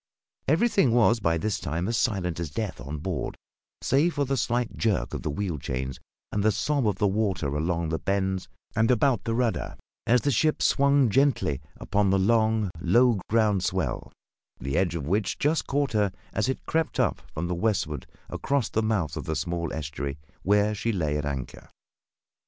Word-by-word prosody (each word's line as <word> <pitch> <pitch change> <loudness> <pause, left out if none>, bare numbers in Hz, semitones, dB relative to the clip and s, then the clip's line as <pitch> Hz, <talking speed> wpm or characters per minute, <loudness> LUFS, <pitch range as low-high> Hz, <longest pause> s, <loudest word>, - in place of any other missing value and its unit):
Everything 165 - +3
was 115 -1 +4
by 85 -5 +1
this 105 +5 -1
time 85 +5 -2
as 115 - 0
silent 95 -7 0
as 85 -3 -3
death 85 - -4
on 70 +5 -5
board, 85 +4 -3 0.5
save 150 +6 +2
for 145 -1 +1
the 135 +1 0
slight 120 0 -1
jerk 110 -4 0
of - - -3
the - - -3
wheel 85 0 -2
chains 65 0 -4 0.3
and 105 - 0
the 110 +2 +4
sob 125 +5 0
of 105 - +1
the 105 - 0
water 95 -8 0
along 85 +1 -1
the 80 0 -1
bends 95 -1 -1 0.3
and 115 0 +3
about 125 -2 +2
the 115 - 0
rudder 120 -2 -1 0.3
as 120 +1 +4
the 145 - +1
ship 155 +6 +2
swung 140 -1 +4
gently 130 - +2 0.2
upon 100 0 +1
the 95 - +3
long, 110 0 +2
low 110 +5 +3
ground 105 -4 +2
swell, - - -2 0.5
the 70 +2 -3
edge 90 -3 +1
of 75 -5 -3
which 100 +6 0
just 150 +1 +1
caught 140 0 0
her 105 -3 +2 0.2
as 105 +3 0
it 130 - -3
crept 160 0 -1
up - - +1
from 85 +3 -2
the 90 - -1
westward 85 -7 -1 0.2
across 140 -5 -1
the 110 - 0
mouth 105 -8 0
of - - -5
the 80 - -2
small 85 +2 -2
estuary 75 -2 -4 0.2
where 105 +2 +3
she 115 +3 -1
lay 80 -8 -1
at 75 -1 -1
anchor. 70 -3 -5
100 Hz, 185 wpm, -26 LUFS, 85-115 Hz, 0.5 s, was